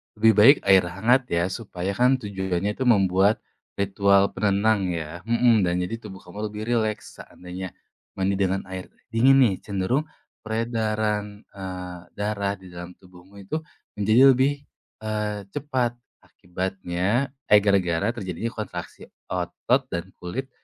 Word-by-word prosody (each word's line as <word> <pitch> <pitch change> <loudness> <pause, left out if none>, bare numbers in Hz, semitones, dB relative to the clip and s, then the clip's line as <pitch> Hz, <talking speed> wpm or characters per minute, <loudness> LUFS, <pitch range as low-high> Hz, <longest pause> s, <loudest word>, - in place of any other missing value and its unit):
Lebih 110 0 +5
baik 130 +8 +8
air 95 -1 +6
hangat 120 +9 +2
ya, 85 0 0
supaya 95 -5 -4
kan 125 +6 +3
tujuannya 95 -1 -2
itu 130 - -1
membuat 100 -2 +3 0.3
ritual 100 0 +3
penenang 100 0 +1
ya 85 0 -5
mhm, 115 +1 +3
dan 90 -1 +1
jadi 115 +6 -4
tubuh 95 -5 -10
kamu 105 +4 -5
lebih 105 +1 -6
rileks. 110 -3 -1
Seandainya 90 0 -8 0.4
mandi 95 +1 0
dengan 95 0 0
air 95 -1 -6 0.2
dingin 130 +4 +5
nih 105 -6 +3
cenderung 105 +10 -1 0.3
peredaran, 110 -2 -2
eee, 90 -2 -7 0.2
darah 105 -1 -1
di 95 -1 -14
dalam 90 0 -9
tubuhmu 90 +1 -18
itu 130 +12 -3 0.4
menjadi 115 +7 +6
lebih, 140 +2 +1 0.4
eee, 105 -1 -2
cepat. 130 -4 -1 0.3
Akibatnya 95 +6 -2 0.2
eh, 105 - +7
gara-gara 95 -1 +2
terjadinya 105 +1 -4
kontraksi 110 -3 -7 0.2
otot - - 0
dan 85 +2 -3
kulit 130 +10 -5
100 Hz, 135 wpm, -24 LUFS, 95-115 Hz, 0.4 s, baik